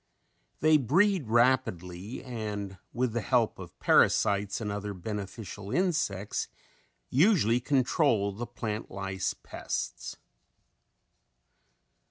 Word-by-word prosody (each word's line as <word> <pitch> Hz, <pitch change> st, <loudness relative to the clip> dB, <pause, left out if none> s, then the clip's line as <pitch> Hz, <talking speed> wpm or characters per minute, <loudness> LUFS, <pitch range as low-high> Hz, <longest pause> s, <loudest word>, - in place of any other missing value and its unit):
They 155 Hz, +1 st, +6 dB
breed 170 Hz, -, +2 dB
rapidly 110 Hz, -5 st, +1 dB
and 105 Hz, -6 st, -5 dB
with 120 Hz, -1 st, -1 dB
the 120 Hz, -, 0 dB
help 120 Hz, -3 st, +1 dB
of 90 Hz, -2 st, -10 dB
parasites 100 Hz, 0 st, +3 dB
and 105 Hz, -3 st, -3 dB
other 100 Hz, 0 st, -4 dB
beneficial 100 Hz, +1 st, -6 dB
insects 155 Hz, -, 0 dB, 0.6 s
usually 135 Hz, -, +4 dB
control 125 Hz, -5 st, +2 dB
the 115 Hz, +5 st, -6 dB
plant 110 Hz, -2 st, -4 dB
lice 95 Hz, -1 st, -3 dB
pests. -, -, -5 dB
110 Hz, 95 wpm, -29 LUFS, 100-130 Hz, 0.6 s, They